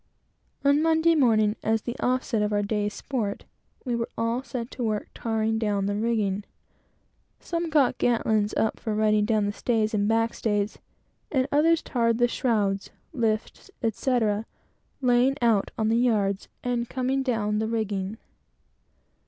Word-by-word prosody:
On 285 +1 +4
Monday 325 +1 +4
morning, 220 -8 +3
as 220 0 0
an 240 - -1
offset 250 -3 0
to 210 - -1
our 205 - +1
day's 205 0 -1
sport, 215 -4 -4 0.4
we 245 -2 0
were 230 0 -2
all 230 +2 0
set 240 -2 -6
to 250 - -5
work 215 -2 -2
"tarring 220 -1 -1
down" 205 -3 0
the 205 - 0
rigging. 210 -3 0 1.0
Some 335 -1 -3
got 295 -5 +2
girt 240 -2 +1
lines 215 -1 +1
up 220 - 0
for 215 -2 -3
riding 215 -1 +3
down 215 -2 +1
the 205 - 0
stays 220 -1 0
and 205 -1 +1
back 225 +1 +2
stays, 205 -1 -1 0.5
and 265 -2 +1
others 320 +3 +3
tarred 230 -2 +1
the 240 0 +4
shrouds, 205 -6 0 0.2
lifts, 225 - -2
etc., 225 -2 0 0.5
laying 250 +1 +3
out 230 -4 +2
on 220 -1 +1
the 230 - +3
yards, 205 -5 +1 0.2
and 240 -1 -1
coming 260 +1 0
down 215 -5 0
the 220 - -1
rigging. 210 -2 -2
225 Hz, 155 wpm, -26 LUFS, 210-245 Hz, 1.0 s, On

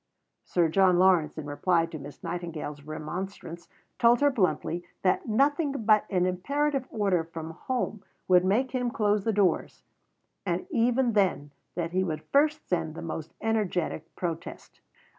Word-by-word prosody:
Sir 175 -2 +2
John 185 +2 +4
Lawrence 180 -5 +3
in 155 - -5
reply 165 +4 +1
to 165 -2 -8
Miss 140 +1 -11
Nightingale's 165 -4 -5
remonstrance 170 +3 -6 0.3
told 235 +1 +5
her 285 0 +4
bluntly 175 - 0 0.2
that 185 +5 +1
nothing 280 +6 +2
but 215 -5 +3
an 180 -2 +2
imperative 275 +9 0
order 195 -6 +1
from 165 -1 -7
home 220 +3 -3 0.2
would 180 -1 +5
make 225 +8 +1
him 250 -1 0
close 210 -5 +1
the 225 - +2
doors, 200 -3 0 0.6
and - - -2
even 245 -1 +2
then 185 -8 +1 0.2
that 170 -1 -2
he 185 +1 +1
would 155 -4 -3
first 300 +2 +2
send 165 -3 -1
the 170 - -7
most 160 -1 -6
energetic 185 -7 -1
protest. 170 -2 -6
185 Hz, 150 wpm, -28 LUFS, 165-230 Hz, 0.6 s, told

